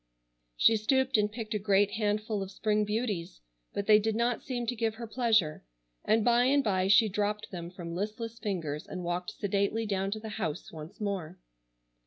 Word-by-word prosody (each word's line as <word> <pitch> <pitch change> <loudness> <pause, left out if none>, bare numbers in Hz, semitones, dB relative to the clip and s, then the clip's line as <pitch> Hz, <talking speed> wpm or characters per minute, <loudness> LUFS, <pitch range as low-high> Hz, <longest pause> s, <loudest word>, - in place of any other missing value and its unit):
She 225 - +5
stooped 265 +4 +1
and 210 -1 +3
picked 220 -1 -5
a 210 - 0
great 200 0 +3
handful 215 0 -1
of 195 - -4
spring 210 +1 0
beauties, 210 - -2 0.3
but 200 - -3
they 215 0 +7
did 220 +1 -1
not 235 0 +1
seem 245 -2 -3
to 245 - -1
give 225 -1 -1
her 235 +1 -6
pleasure, 220 -9 +1 0.4
and 220 0 +2
by 240 0 +4
and 280 +2 +4
by 190 -4 +1
she 200 +3 +6
dropped 210 +1 -2
them 170 -2 -6
from 175 -2 -7
listless 220 +5 -4
fingers 165 -8 -3
and 180 -1 -6
walked 175 +1 -2
sedately 205 +3 -1
down 195 -2 -1
to 215 +2 -3
the 220 0 -7
house 155 -5 -3
once 160 +6 -10
more. 200 -6 -3
210 Hz, 190 wpm, -30 LUFS, 195-225 Hz, 0.4 s, they